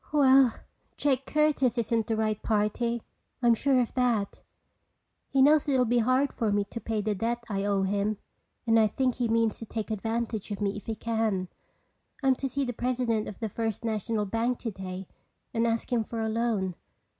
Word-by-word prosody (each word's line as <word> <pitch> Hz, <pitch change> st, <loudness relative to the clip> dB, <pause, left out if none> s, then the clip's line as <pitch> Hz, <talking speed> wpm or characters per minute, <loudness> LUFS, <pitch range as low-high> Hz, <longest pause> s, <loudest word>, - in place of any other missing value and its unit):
"Well, 270 Hz, -4 st, +5 dB, 0.4 s
Jake 270 Hz, -2 st, +1 dB
Curtis 300 Hz, -5 st, +2 dB
isn't 230 Hz, -1 st, 0 dB
the 225 Hz, -, 0 dB
right 215 Hz, -1 st, 0 dB
party. 225 Hz, +2 st, 0 dB, 0.4 s
I'm 235 Hz, -1 st, +6 dB
sure 265 Hz, +3 st, +2 dB
of 240 Hz, -, -1 dB
that. 235 Hz, -6 st, 0 dB, 0.9 s
He 270 Hz, -1 st, +4 dB
knows 295 Hz, +1 st, +5 dB
it 270 Hz, -, +3 dB
will 250 Hz, -, +3 dB
be 240 Hz, +1 st, +2 dB
hard 255 Hz, +4 st, +2 dB
for 220 Hz, -3 st, 0 dB
me 205 Hz, 0 st, +2 dB
to 230 Hz, -, -5 dB
pay 220 Hz, -2 st, -1 dB
the 210 Hz, +1 st, 0 dB
debt 230 Hz, +4 st, -2 dB
I 200 Hz, -2 st, -2 dB
owe 200 Hz, -1 st, +1 dB
him 200 Hz, +2 st, 0 dB, 0.5 s
and 225 Hz, -1 st, +4 dB
I 220 Hz, -, +5 dB
think 255 Hz, +4 st, 0 dB
he 245 Hz, -1 st, -1 dB
means 225 Hz, -1 st, +1 dB
to 225 Hz, -, -6 dB
take 220 Hz, 0 st, -4 dB
advantage 225 Hz, 0 st, -2 dB
of 205 Hz, -, -4 dB
me 200 Hz, -1 st, -1 dB
if 210 Hz, -, -9 dB
he 225 Hz, -, -2 dB
can. 220 Hz, -4 st, -1 dB, 0.7 s
I'm 265 Hz, -1 st, +5 dB
to 270 Hz, -, -2 dB
see 275 Hz, +1 st, -1 dB
the 245 Hz, -, -3 dB
president 240 Hz, -2 st, -1 dB
of 205 Hz, -, -9 dB
the 225 Hz, -, -2 dB
First 225 Hz, +1 st, -3 dB
National 220 Hz, -1 st, -1 dB
bank 230 Hz, +4 st, 0 dB
today 190 Hz, -4 st, -6 dB, 0.5 s
and 230 Hz, 0 st, +2 dB
ask 230 Hz, +2 st, -1 dB
him 230 Hz, -2 st, +2 dB
for 230 Hz, +1 st, -6 dB
a 220 Hz, 0 st, 0 dB
loan. 220 Hz, -5 st, 0 dB
225 Hz, 195 wpm, -28 LUFS, 210-245 Hz, 0.9 s, I'm